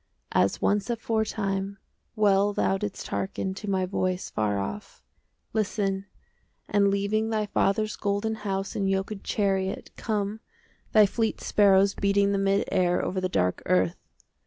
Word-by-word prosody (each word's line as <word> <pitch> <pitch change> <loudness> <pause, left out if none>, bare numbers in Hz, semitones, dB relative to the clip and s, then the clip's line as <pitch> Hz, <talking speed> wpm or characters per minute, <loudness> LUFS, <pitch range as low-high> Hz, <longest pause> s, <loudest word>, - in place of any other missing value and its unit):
As - - +2
once 205 +2 +1
aforetime 210 -4 -1 0.4
Well 205 -1 +3
thou 195 - +1
didst 205 -1 -5
hearken 190 0 -2
To 200 +2 -6
my 190 -1 +1
voice 185 -1 -2
far 105 -2 0
off,— 195 - -6 0.5
Listen, 200 -2 -1 0.6
and 205 -1 +3
leaving 200 +2 +1
10 - - -3
Thy 215 -1 0
father's 210 +1 +1
golden 205 +2 -1
House 195 -1 -3
in 195 - 0
yoked 195 +1 -2
chariot, 195 -2 -1
Come, 210 -1 -2 0.5
thy 215 -1 +7
fleet 220 +2 -1
sparrows 200 -1 +4
Beating 200 0 +2
the 200 - +1
mid 195 0 +1
air 180 -2 +2
Over 185 0 -2
the 185 - -1
dark 90 - 0
earth. 90 -1 +2
200 Hz, 145 wpm, -27 LUFS, 195-210 Hz, 0.6 s, thy